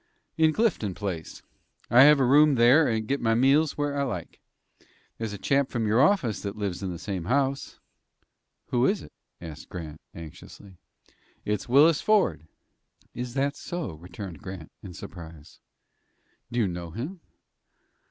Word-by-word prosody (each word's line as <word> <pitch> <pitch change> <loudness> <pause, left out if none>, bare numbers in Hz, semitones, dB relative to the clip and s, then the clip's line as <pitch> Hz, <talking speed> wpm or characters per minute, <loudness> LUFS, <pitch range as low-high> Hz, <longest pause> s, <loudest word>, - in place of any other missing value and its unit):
"In 160 -1 +4
Clinton 155 - 0
Place. 95 -6 -6 0.5
I 120 - +8
have 150 -1 +6
a 135 - +3
room 145 +3 +5
there, 125 +6 +5
and 110 -1 -1
get 140 +3 -1
my 115 -1 +2
meals 140 +5 +3
where 145 -1 -1
I 140 - 0
like. 110 - -5 0.8
There's 110 -2 -3
a 100 - -6
chap 140 +6 +1
from 115 -3 -2
your 110 +4 +3
office 135 - +2
that 100 0 -5
lives 100 -3 -3
in 95 - -3
the 85 - -6
same 95 -2 -5
house." 135 +4 -1 0.9
"Who 125 0 +2
is 200 0 0
it?" - - -14 0.3
asked 80 -2 -10
Grant, 80 -4 -8
anxiously. 85 +3 -12 0.7
"It's 105 +3 -2
Willis 145 +5 +5
Ford." 95 - +1 0.7
"Is 125 +1 -6
that 140 +1 0
so?" 170 - -5
returned 90 +1 -9
Grant, 90 -4 -9
in 90 -4 -10
surprise. 80 -3 -11 0.9
"Do 120 - -1
you 105 - +2
know 85 -1 -5
him?" 145 - -6
115 Hz, 155 wpm, -26 LUFS, 90-140 Hz, 0.9 s, I